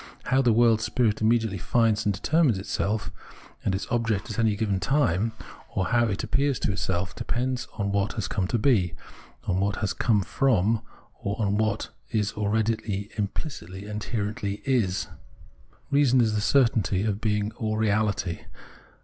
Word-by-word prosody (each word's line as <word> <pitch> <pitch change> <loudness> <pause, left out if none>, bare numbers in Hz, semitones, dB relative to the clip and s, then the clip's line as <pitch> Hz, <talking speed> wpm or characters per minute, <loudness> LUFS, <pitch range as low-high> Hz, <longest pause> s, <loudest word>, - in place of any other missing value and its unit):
How 130 +1 +2
the 125 -3 +4
world 115 -1 +4
spirit 110 -1 +1
immediately 110 -3 +2
finds 110 0 +2
and - - +4
determines 145 - +2
itself 100 +2 -2 0.5
and 95 - +1
its 95 - -3
object 115 -4 0
at - - -3
any 110 -2 +3
given 100 -3 0
time, 115 - +1 0.4
or 95 -2 0
how 120 0 +3
it 100 -2 -2
appears 140 -2 +1
to - - +1
itself, 95 -1 -2
depends 125 +1 -2
on 100 -2 -2
what 100 +1 0
it - - -14
has 105 -5 -2
come 95 -1 -1
to 120 - 0
be, 105 -8 +2 0.5
on 90 0 0
what 100 +1 +1
it - - -6
has 105 - 0
come 105 -5 +2
from, 110 -2 +2 0.4
or 100 +2 -3
on 100 -2 +1
what 110 0 0 0.2
it 105 -3 -1
already 105 -1 -1
imphcitly 100 - -4
and 105 0 -4
inherently 105 -2 -3
is. 115 -9 +1 0.8
Reason 140 -3 +4
is 110 -3 +3
the 105 - 0
certainty 110 -6 +2
of 105 -1 -1
being 105 -1 0
all 110 -1 -1
reahty. 105 -5 0
110 Hz, 165 wpm, -26 LUFS, 100-115 Hz, 0.8 s, the